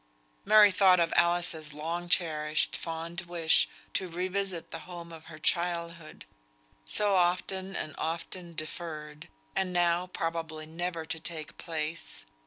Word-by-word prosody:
Mary 210 0 +8
thought 185 -1 +5
of 165 -1 +2
Alice's 170 -3 +2
long 170 +3 -4
cherished, 155 -4 +2
fond 165 +1 -4
wish 165 -2 +3 0.2
to 185 - 0
revisit 185 0 -2
the 165 - -5
home 170 -1 -8
of 160 0 -11
her 155 - -10
childhood, 170 0 -1 0.6
so 205 - +6
often 185 +2 +1
and 155 - -4
often 170 +1 -4
deferred, 155 -1 -6 0.3
and 190 -1 0
now 175 0 +2
probably 165 -3 -3
never 165 +1 -4
to 165 0 -4
take 155 -1 -7
place. 160 - -4
170 Hz, 130 wpm, -30 LUFS, 160-180 Hz, 0.6 s, Mary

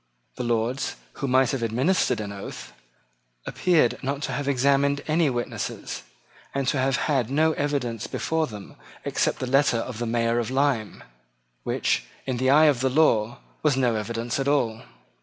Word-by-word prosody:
The 125 - -4
Lords, 120 +2 -1 0.3
who 140 - 0
might 130 0 +3
have 135 -3 -2
administered 125 - +1
an 105 -1 -5
oath, 80 -11 -8 0.7
appeared 165 -9 +2
not 140 +2 -2
to - - -2
have 145 -1 -3
examined 140 +1 +2
any 155 0 +3
witness, 120 -2 -4 0.5
and 140 -1 -1
to 140 - 0
have 135 0 +2
had 130 -6 0
no 155 +4 +3
evidence 140 -7 -2
before 160 -1 -1
them 105 -3 -10 0.3
except - - 0
the - - -3
letter 135 -1 +3
of 115 0 -4
the 120 - -2
Mayor 115 0 +1
of 120 - -2
Lyme, 130 -5 0 0.6
which, - - 0 0.2
in 130 -2 -2
the 130 +1 +1
eye 150 +3 +7
of 145 -5 +4
the 130 +1 +1
law, 120 -6 +2 0.2
was 145 -4 +2
no 125 -3 +2
evidence 115 +3 -2
at 135 - -1
all. 120 -6 +1
130 Hz, 170 wpm, -25 LUFS, 115-140 Hz, 0.7 s, eye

